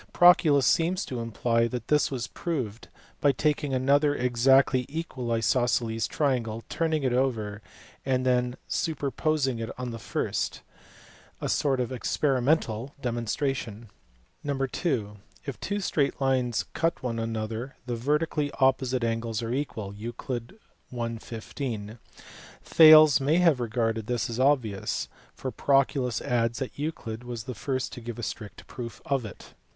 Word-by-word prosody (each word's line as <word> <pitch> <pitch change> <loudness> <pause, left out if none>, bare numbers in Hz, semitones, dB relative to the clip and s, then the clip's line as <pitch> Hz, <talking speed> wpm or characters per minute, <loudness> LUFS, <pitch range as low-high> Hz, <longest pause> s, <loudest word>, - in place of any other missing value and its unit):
Proclus 160 -6 +6
seems 175 +3 +2
to 125 - -5
imply 115 +1 +1
that 120 -1 -5
this 150 0 +3
was 125 -4 -3
proved 125 -11 -4 0.3
by 145 - +4
taking 145 +1 0
another 140 +3 +3
exactly 125 +1 +3
equal 140 -6 -4
isosceles 115 0 +1
triangle, 120 -6 -1
turning 160 -2 0
it 130 -2 +1
over, 110 -5 0 0.4
and 130 -1 0
then 125 -1 +2
superposing 145 -4 -1
it 115 0 -4
on 125 -1 -4
the 115 - -6
first; - - -2 0.8
a - - -3
sort 135 -3 +1
of 125 -1 -1
experimental 130 -1 0
demonstration. 120 -2 -2 0.5
(ii) 145 - -2 0.9
If 140 - -5
two 205 +1 -2
straight 150 -7 0
lines 130 -3 +1
cut 165 -3 0
one 115 -2 -2
another 115 +3 -4
the 120 -1 -2
vertically 150 +4 0
opposite 130 -2 +2
angles 115 -1 -1
are 115 +1 -2
equal 115 -8 -3
(Euc. 120 - -6 0.4
i. 115 -1 -2
15). 110 -1 -6 0.6
Thales 155 -3 +8
may 145 +5 +3
have 165 -7 +4
regarded 115 -2 -1
this 120 -1 -1
as 115 - -4
obvious, 130 -8 +1 0.3
for 130 - -4
Proclus 135 -3 +1
adds 115 -1 0
that 135 0 -5
Euclid 125 -7 -4
was 120 -2 -6
the 125 - -5
first 130 +4 -3
to 125 - -8
give 120 0 -6
a 120 - -6
strict 105 0 -6
proof 115 -3 -7
of 135 -3 0
it. 105 - -11
125 Hz, 140 wpm, -27 LUFS, 115-140 Hz, 0.9 s, Thales